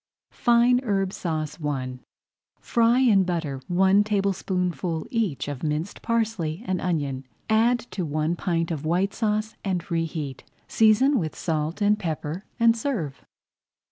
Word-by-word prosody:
FINE 240 +1 +4
HERB 195 -5 0
SAUCE 155 -2 -3
I 130 -3 -3 0.6
Fry 235 +1 +3
in 210 -7 +5
butter 165 -7 -2
one 190 +3 +4
tablespoonful 185 -4 -1
each 215 - -1
of 145 -3 -5
minced 155 +4 -3
parsley 225 -7 -1
and 185 -4 -1
onion. 145 -7 -1 0.3
Add 235 +2 +4
to 185 - -3
one 155 +2 -1
pint 170 -2 -1
of 155 -3 -3
White 180 +5 +1
Sauce 215 -1 -1
and 185 -4 -1
reheat. 160 -5 -3 0.2
Season 230 +5 +4
with 160 -4 -3
salt 160 +4 -2
and 210 +1 +3
pepper, 165 0 -4
and 230 0 +5
serve. 215 - -3
180 Hz, 135 wpm, -25 LUFS, 155-215 Hz, 0.6 s, in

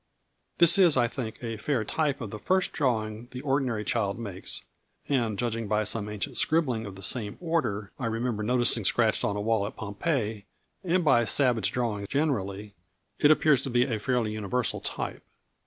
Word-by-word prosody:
This 170 +2 +7
is, 175 -7 +6
I 120 -1 +4
think, 115 -2 -5
a 115 -1 -4
fair 120 +1 -1
type 145 +2 -1
of 110 -4 -5
the 105 - -6
first 185 - +1
drawing 110 -4 -1
the 125 0 -7
ordinary 135 -6 0
child 105 -4 -1
makes 100 -5 -5 0.4
and 115 -7 0
judging 115 -1 -2
by 105 +1 +1
some 105 0 0
ancient 105 +5 -4
scribbling 130 -9 +1
of 100 - -8
the 95 - -9
same 105 0 -1
order 125 - -1
I 125 - -1
remember 115 -1 -2
noticing 120 0 +2
scratched 110 +3 +2
on 100 - 0
a 105 - -2
wall 110 -1 +1
at - - -9
Pompeii, 110 0 -2 0.4
and 180 -1 +1
by 130 -5 +5
savage 120 -6 +2
drawing 110 -5 -2
generally, 105 -9 -1 0.5
it 145 - +5
appears 155 -3 +4
to 135 - -3
be 120 0 +3
a 120 -4 -2
fairly 120 0 0
universal 110 +3 -1
type. - - -4
115 Hz, 180 wpm, -27 LUFS, 105-135 Hz, 0.5 s, This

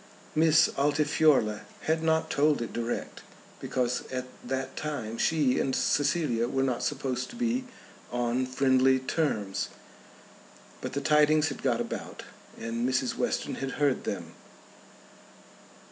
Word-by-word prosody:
Miss 160 0 +5
Altifiorla 145 -6 +3 0.2
had 160 +1 0
not 160 0 +1
told 150 +1 +3
it 115 - -5
direct, 120 0 -3 0.4
because 125 -1 -1
at 130 -1 -3 0.2
that 130 +1 -3
time 125 -7 -4
she 150 -6 +2
and 130 - 0
Cecilia 140 -5 +1
were 135 +1 0
not 130 -3 0
supposed 130 -1 -2
to - - -10
be 245 +1 0 0.5
on 120 +1 0
friendly 130 0 +3
terms. 130 -8 -1 1.1
But - - -5
the 140 - -1
tidings 150 +1 +4
had 135 - -7
got - - +1
about - - -6 0.4
and 115 +2 -2
Mrs. 130 -1 0
Western - - -1
had 135 0 -3
heard 145 -3 +1
them. - - -4
135 Hz, 130 wpm, -28 LUFS, 125-150 Hz, 1.1 s, Miss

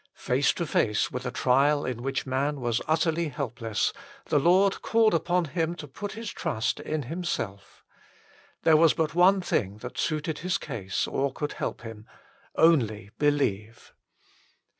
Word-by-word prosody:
l - - -34
Face 130 +3 +1
to 170 - -3
face 105 -8 +1
with 125 0 -4
a - - 0
trial 140 +4 +2
in 125 -2 -4
which 135 +1 -2
man 140 +2 -1
was 120 -2 -1
utterly 160 +1 +1
helpless, 120 - -2 0.4
the 150 - +3
Lord 185 +6 +3
called 225 -2 +3
upon 175 +1 +1
him 165 +2 -2
to 150 - -9
put 200 +9 -6
his 225 0 -6
trust 110 +1 -2
in 155 -1 -3
Himself. 120 - -5 0.8
There 160 -1 +6
was 165 0 +5
but 155 -2 0
one 185 +3 +5
thing 100 - -1
that - - -7
suited 155 0 -1
his 180 +2 0
case 100 -10 -3
or 140 0 -1
could 150 +2 -4
help - - -4
him: 110 -1 -9 0.2
" 275 0 -32
only 115 -11 +3
believe." 120 -7 -1
145 Hz, 160 wpm, -27 LUFS, 120-170 Hz, 0.8 s, There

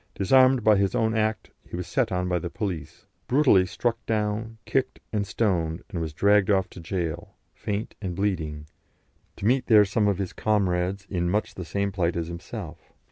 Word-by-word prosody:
Disarmed 130 +4 +4
by 105 -1 +5
his 100 +3 +1
own 110 -2 +1
act, 110 0 -1
he - - -9
was 90 0 -4
set 115 +6 0
on 90 0 -1
by 90 -1 0
the 85 - -5
police, 85 -8 -5 0.2
brutally 125 -9 +4
struck 115 +5 -2
down, 110 +1 -1
kicked 130 -1 -1
and 100 -2 0
stoned, 90 -6 0
and 85 - -3
was 80 -1 -3
dragged 100 +5 +3
off 95 -2 +3
to - - -10
gaol, 85 -2 -4 0.2
faint 105 +1 -4
and 90 -4 -4
bleeding, 80 -7 -2 0.7
to - - -6
meet 125 +3 +2
there 105 -2 +7
some 105 +2 +1
of 100 -3 +1
his 95 -2 -4
comrades 95 -2 0
in 85 -2 -1
much 105 +4 -1
the 90 - -6
same 100 +3 -1
plight 90 -3 0
as 85 -1 -3
himself. 85 0 -8
100 Hz, 190 wpm, -26 LUFS, 90-110 Hz, 0.7 s, there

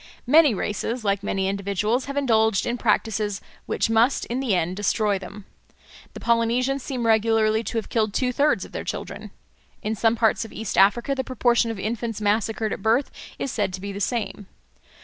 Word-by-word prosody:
Many 290 -2 +5
races, 220 +4 -3
like 200 -1 +1
many 195 -1 -1
individuals, 200 +5 -1
have 280 0 -5
indulged 220 -6 +2
in 240 - -1
practices 210 -2 0 0.3
which - - 0
must 225 +4 +2
in 245 +2 -3
the 250 -7 +1
end 175 +1 -1
destroy 205 0 +1
them. 195 +2 -10 0.7
The - - -6
Polynesians 235 +4 +1
seem 255 -3 -4
regularly 220 0 +3
to 235 - -3
have 225 - -2
killed 220 -2 +1
two 250 +4 0
thirds 290 +4 +2
of - - -14
their - - -5
children. - - -6 0.5
In 215 - -1
some 225 +1 +2
parts 225 0 +2
of 225 - -10
East 220 -2 -5
Africa 210 +8 +4
the 265 -1 -2
proportion 240 -2 +1
of 225 - -4
infants 225 +2 -3
massacred 215 +1 0
at - - -6
birth 230 +6 +2 0.3
is 270 - -3
said 205 -5 -1
to 185 - -4
be 200 +1 -5
the 200 +1 -6
same. 215 -3 -2
225 Hz, 190 wpm, -24 LUFS, 205-240 Hz, 0.7 s, Many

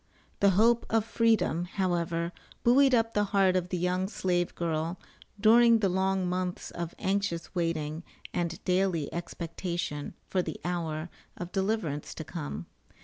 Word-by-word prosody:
The 200 - +5
hope 235 +2 +4
of 225 -1 +2
Freedom, 220 -7 +2
however, 175 -3 -1 0.3
buoyed 265 +2 +6
up 225 -1 +1
the 205 0 +2
heart 195 -2 +3
of 180 -1 0
the 185 - -1
young 180 +2 0
slave 175 -3 -1
girl 165 +1 -1 0.4
during 230 +2 +7
the 205 -3 +1
long 190 0 +1
months 180 0 -2
of 170 -1 -5
anxious 195 -3 -1
waiting 165 -3 -1 0.3
and 170 -1 -2
daily 180 -5 +1
expectation 170 -2 -4
for 185 - 0
the - - -5
hour 165 -2 -2 0.3
of 175 0 -6
deliverance 190 -7 -1
to - - -5
come. 70 +4 -5
180 Hz, 145 wpm, -29 LUFS, 170-200 Hz, 0.4 s, during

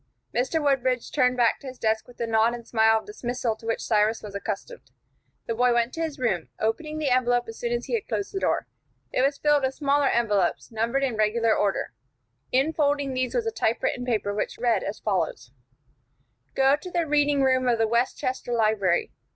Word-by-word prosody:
Mr. 260 +7 0
Woodbridge 260 -4 0
turned 250 -3 +2
back 235 -2 +3
to 280 - -11
his 255 -1 -8
desk 220 -1 0
with 245 - -16
the 235 - -2
nod 225 +1 +2
and 235 -1 -11
smile 225 -1 +4
of - - -6
dismissal 245 - -3
to 225 - -11
which 225 - -1
Cyrus 215 0 +1
was 205 -2 -8
accustomed. 210 - -6 0.6
The 230 - -2
boy 245 +1 +2
went 235 +1 +1
to 330 - -4
his 315 -3 -3
room, 195 - -1
opening 305 +8 -2
the 300 -4 0
envelope 245 -1 +2
as 225 - -9
soon 235 - -2
as 240 0 -1
he - - -6
had 450 -3 -1
closed 400 - -3
the 390 - -1
door. - - 0 0.5
It - - +1
was 275 +1 +2
filled 295 -1 +3
with 265 0 -1
smaller 285 -1 +2
envelopes, 210 -4 +1
numbered 230 +5 0
in 250 -5 -1
regular 220 +1 +2
order. 200 -1 -1 0.6
Infolding 285 0 +1
these 255 -1 -1
was 475 -2 0
a 450 - 0
typewritten 245 - -1
paper, 215 -5 -1
which 210 - -3
read 235 -1 +1
as 205 - -4
follows: 170 - -2 1.0
"Go 270 +1 +4
to 365 +5 -9
the 345 -2 0
reading 290 -2 +2
room 260 -1 +2
of 240 -1 +3
the 225 0 +2
Westchester 245 +2 -1
Library. 215 -6 +1
245 Hz, 200 wpm, -25 LUFS, 225-275 Hz, 1.0 s, smile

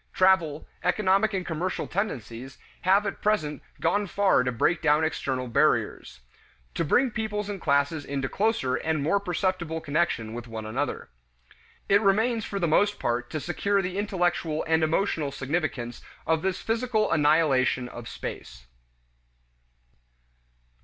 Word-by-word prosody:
Travel, 170 -5 +3 0.2
economic 205 +1 +2
and 190 -3 -2
commercial 175 +3 -2
tendencies, 130 - -4 0.2
have 195 +3 +3
at 200 - -4
present 155 -9 0 0.2
gone 205 0 +1
far 195 -5 +3
to 125 0 0
break 125 +9 +1
down 150 0 +3
external 130 -5 -2
barriers; 115 - 0 0.5
to - - -1
bring 245 - +3
peoples 210 -1 -3
and 200 -3 -5
classes 145 +1 +1
into 140 -1 -3
closer 200 - 0
and 155 +1 -1
more 180 +7 +2
perceptible 180 -3 -1
connection 145 -8 -1
with 120 0 -7
one 110 -1 -6
another. 130 +7 -3 0.8
It 200 +1 +5
remains 220 +3 +2
for 200 - -4
the 175 -3 +1
most 205 +6 +3
part 120 0 -1
to 155 - -3
secure 195 +5 0
the 185 +2 -3
intellectual 175 -5 0
and 160 0 +3
emotional 155 -3 0
significance 135 -4 -3 0.2
of 160 0 +1
this 190 0 -1
physical 225 -1 0
annihilation 145 -5 +3
of 120 -1 -9
space. - - -8
165 Hz, 140 wpm, -26 LUFS, 140-200 Hz, 0.8 s, It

